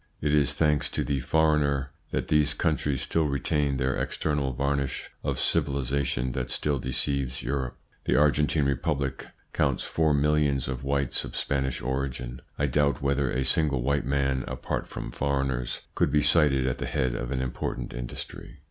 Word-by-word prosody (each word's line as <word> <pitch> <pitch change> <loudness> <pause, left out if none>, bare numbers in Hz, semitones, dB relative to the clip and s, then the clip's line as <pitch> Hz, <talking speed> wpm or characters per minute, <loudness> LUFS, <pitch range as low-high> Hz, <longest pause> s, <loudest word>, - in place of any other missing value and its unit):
It 75 0 0
is 70 -4 +3
thanks 75 -2 +2
to - - +2
the 70 -1 -1
foreigner 70 -1 +2 0.2
that - - -2
these 75 -1 +3
countries 75 -4 0
still 80 -2 +1
retain 70 0 0
that 65 0 0
external 75 -3 -1
varnish 70 +1 -2
of - - -1
civilisation 70 -2 +1
that 65 -1 -3
still 70 +2 0
deceives 65 0 -1
Europe. 65 -3 -2 0.3
The - - +2
Argentine 75 0 +3
Republic 70 -1 -1 0.3
counts - - +1
four 80 -2 +2
millions 75 -2 +2
of 65 0 -4
whites 70 -1 +1
of - - -7
Spanish 65 -3 -1
origin; 65 -2 -3 0.2
I 70 - +1
doubt 70 +1 +1
whether 70 -1 +1
a 65 +1 0
single 70 -2 +2
white 70 0 0
man, 70 -1 +1
apart - - -3
from - - -6
foreigners, 65 -3 -1
could - - +1
be 75 0 +3
cited 75 -4 +4
at 65 - -1
the - - -2
head 65 -2 0
of - - -3
an 65 -1 -1
important 65 -1 -4
industry. - - -7
70 Hz, 165 wpm, -27 LUFS, 65-75 Hz, 0.3 s, cited